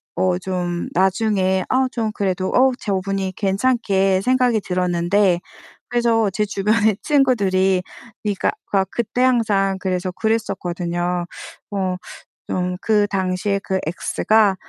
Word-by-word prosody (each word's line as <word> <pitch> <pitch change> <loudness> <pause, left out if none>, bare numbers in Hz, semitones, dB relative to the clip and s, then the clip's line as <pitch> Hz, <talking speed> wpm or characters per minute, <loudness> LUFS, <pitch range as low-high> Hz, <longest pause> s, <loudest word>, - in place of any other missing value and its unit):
어 185 -1 +1
좀 180 -2 -3
나중에 190 0 +2
아 260 0 +2
좀 225 -3 -2
그래도 185 -2 -1
어 260 +1 +4
저분이 195 -1 -2
괜찮게 195 -2 +1
생각이 250 -2 +2
들었는데 180 +1 +1 0.5
그래서 230 -3 +2
제 210 +2 0
주변에 210 +1 +2
친구들이 195 -10 +2 0.4
그러니까 205 -2 0
그 200 - -1
아 - - +3
그때 240 +1 -2
항상 210 -6 +2
그래서 185 -1 -2
그랬었거든요. 175 -5 -2 0.5
어 185 -2 -1 0.5
좀 180 0 -1
그 210 -2 +2
당시에 190 +1 -1
그 190 - -1
ex가 200 +4 +2
195 Hz, 260 characters per minute, -20 LUFS, 185-220 Hz, 0.5 s, 어